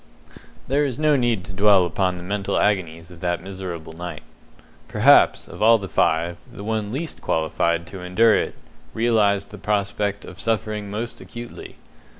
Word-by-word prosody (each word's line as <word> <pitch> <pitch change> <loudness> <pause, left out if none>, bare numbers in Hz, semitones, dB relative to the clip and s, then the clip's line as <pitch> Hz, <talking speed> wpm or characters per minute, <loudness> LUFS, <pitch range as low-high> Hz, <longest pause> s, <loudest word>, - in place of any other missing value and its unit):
There 140 +3 +2
is 130 -4 -2
no 155 -1 +3
need 120 -8 +1
to 95 - -9
dwell 100 -1 +5
upon 90 +2 0
the 90 - -8
mental 100 +1 -2
agonies 85 -5 0
of 85 - -13
that 85 0 -2
miserable 90 -4 -7
night. 85 +1 -7 0.6
Perhaps, - - +5
of - - -10
all 115 +1 +7
the 100 -3 -6
five, 85 0 +1
the 100 - -9
one 110 -1 -2
least 155 +6 -5
qualified 85 +1 0
to 95 +1 -9
endure 105 +5 +4
it - - -1 0.4
realized 105 -4 +2
the 105 - -10
prospect 100 0 -1
of 90 - -11
suffering 110 -2 -2
most 110 +4 -5
acutely. 120 0 -9
100 Hz, 160 wpm, -23 LUFS, 90-110 Hz, 0.6 s, all